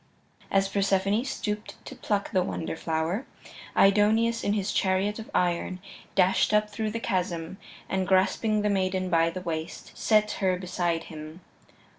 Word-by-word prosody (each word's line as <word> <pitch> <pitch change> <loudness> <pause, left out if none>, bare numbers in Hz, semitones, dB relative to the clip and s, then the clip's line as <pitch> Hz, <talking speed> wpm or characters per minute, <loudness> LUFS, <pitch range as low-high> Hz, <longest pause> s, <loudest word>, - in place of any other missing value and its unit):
As 195 0 +2
Persephone 200 +2 +1
stooped 210 -5 -4
to - - -8
pluck 205 -1 -2
the 185 - +3
wonder 165 -3 -3
flower, 165 - -2 0.5
Aidoneus, 220 +4 +4
in 205 - +1
his 205 -1 -1
chariot 195 +3 +1
of 225 - -8
iron, 180 +1 0 0.4
dashed 190 +2 +3
up 210 0 +2
through 215 +1 -2
the 230 +2 -3
chasm, 180 -4 -2 0.3
and 190 -1 -1
grasping 200 +3 +2
the 210 - +2
maiden 185 -1 0
by 165 0 +4
the 185 +2 -6
waist, 165 -2 -5
set 215 -1 +3
her 185 -1 +2
beside 175 -2 -1
him. 155 +2 -9
190 Hz, 150 wpm, -27 LUFS, 180-210 Hz, 0.5 s, Aidoneus